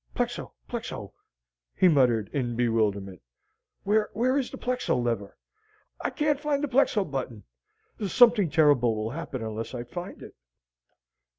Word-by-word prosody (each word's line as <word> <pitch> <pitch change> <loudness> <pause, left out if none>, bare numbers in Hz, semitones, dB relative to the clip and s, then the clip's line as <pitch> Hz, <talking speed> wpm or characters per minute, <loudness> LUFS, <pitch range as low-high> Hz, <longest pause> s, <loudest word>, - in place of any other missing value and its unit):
"Plexo, - - -3
plexo!" - - -6 0.6
he 185 - +5
muttered 125 - +3
in 120 -4 -1
bewilderment. 105 -6 0 0.6
"Where 210 +1 +2 0.3
is 275 -3 0
the - - -8
plexo 250 0 -1
lever? 115 -5 -2 0.7
I - - +1
can't 295 -2 0
find 295 -1 -1
the - - +1
plexo 245 -6 +2
button! 130 - -5 0.6
Something 230 -5 +5
terrible 145 -7 +4
will 110 +1 -3
happen 140 -5 -5
unless 110 +3 -5
I 120 - -4
find 175 +10 -8
it." - - -11
135 Hz, 130 wpm, -27 LUFS, -, 0.7 s, he